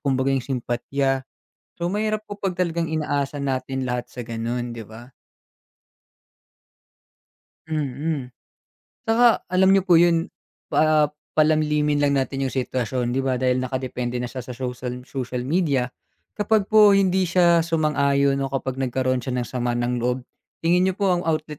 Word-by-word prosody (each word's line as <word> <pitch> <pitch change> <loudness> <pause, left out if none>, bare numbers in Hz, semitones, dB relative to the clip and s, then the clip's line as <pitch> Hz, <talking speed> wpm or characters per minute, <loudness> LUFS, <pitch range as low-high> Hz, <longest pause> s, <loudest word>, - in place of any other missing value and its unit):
kumbaga 135 -1 +1
yung 135 - +1
simpatiya. 135 +1 -2 0.5
So, 170 +1 -1
mahirap 215 0 -1
po 205 - -8
'pag 190 -2 -1
talagang 170 -2 0
inaasa 145 -2 -1
natin 130 0 -2
lahat 125 0 -3
sa 125 - -7
gano'n, 120 +1 -3
'di 115 - -7
ba? 115 +3 -12 2.6
Mm. 145 -2 -2 0.7
Tsaka 235 +1 +4
alam 190 +1 +4
niyo 195 - +4
po 175 -3 +5
yun, 170 -1 +3 0.4
pa 155 -1 +3 0.2
palalimin 150 -1 +2
lang 140 -1 +3
natin 135 +1 -1
yung - - -4
sitwasyon. 125 -1 -1
'Di 135 - +1
ba 130 -1 0
dahil 130 0 +1
nakadepende 125 -1 -3
na - - -2
siya 130 -1 -6
sa 125 0 -8
social 125 0 -5
social 125 -2 -4
media, 140 -4 0 0.5
kapag 210 -1 +2
po 210 -2 +7
hindi 190 -1 +3
siya 170 -1 +4
sumang-ayon 140 -4 +2
o 135 - -3
kapag 135 -1 -3
nagkaroon 130 -1 0
siya 130 0 -3
ng 120 - -2
sama 120 -1 -1
ng 120 0 -1
loob, 125 +1 -1 0.4
tingin 180 +3 +3
niyo 190 - 0
po 195 -2 +2
ang 175 - -1
outlet 155 -2 -2
140 Hz, 155 wpm, -23 LUFS, 125-165 Hz, 2.6 s, po